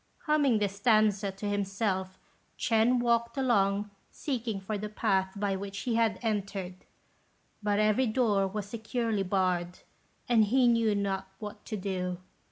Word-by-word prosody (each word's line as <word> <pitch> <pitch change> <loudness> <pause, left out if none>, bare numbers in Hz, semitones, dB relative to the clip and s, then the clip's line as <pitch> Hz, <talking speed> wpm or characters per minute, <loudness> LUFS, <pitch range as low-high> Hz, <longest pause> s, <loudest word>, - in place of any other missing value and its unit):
Humming 290 -6 +3
this 200 -1 -1
stanza 210 -2 +3
to 195 +2 -6
himself, 195 -2 -1 0.4
Ch'ên 230 +2 +3
walked 235 0 +1
along 205 -5 +1 0.2
seeking 235 -8 -3
for 195 +3 -4
the 210 +1 -4
path 195 -3 0
by 200 -1 -1
which 200 +1 -5
he 245 - -1
had 225 -3 +2
entered; 195 -4 -3 0.8
but 205 -1 +1
every 215 +4 +3
door 215 -4 +2
was 200 +1 -4
securely 225 -1 -2
barred, 180 -2 0 0.5
and 230 -3 +5
he 250 +4 +3
knew 230 -3 +3
not 195 -1 -1
what 210 0 -8
to 215 - -4
do. 185 -2 -3
210 Hz, 145 wpm, -29 LUFS, 195-230 Hz, 0.8 s, and